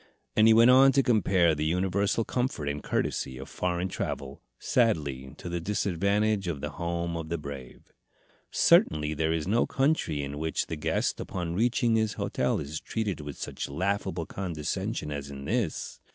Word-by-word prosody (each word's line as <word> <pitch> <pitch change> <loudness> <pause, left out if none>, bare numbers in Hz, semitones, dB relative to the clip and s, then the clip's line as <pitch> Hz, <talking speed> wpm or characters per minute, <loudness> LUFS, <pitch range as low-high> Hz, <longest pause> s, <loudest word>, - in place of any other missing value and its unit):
And 110 0 +6
he 110 - +7
went 115 +2 +7
on 135 +1 +7
to 135 +1 +4
compare 95 -8 +3
the 75 0 -2
universal 95 +6 +1
comfort 125 - -2
and 70 0 -2
courtesy 65 -1 -2
of 65 - -8
foreign 90 0 -1
travel, 70 -6 -5 0.2
sadly 70 - 0
to - - -8
the 85 0 -2
disadvantage 100 +2 0
of 80 -5 -2
the 75 +1 -4
home 85 +1 -3
of 80 -1 -5
the 85 - -1
brave. 70 -4 -9 0.6
"Certainly 75 0 +4
there 80 +1 0
is 80 0 -1
no 115 +4 +2
country 135 - +1
in 70 +1 -5
which 80 0 -1
the - - -4
guest 75 - -1
upon 85 -2 -4
reaching 115 +3 +2
his 110 -1 +1
hotel - - -1
is 75 +2 -5
treated 105 -8 -3
with 75 -2 -7
such - - -5
laughable 90 +1 -1
condescension 80 -4 -3
as 70 -1 -5
in 70 0 -8
this. 110 - -2
85 Hz, 170 wpm, -28 LUFS, 75-105 Hz, 0.6 s, he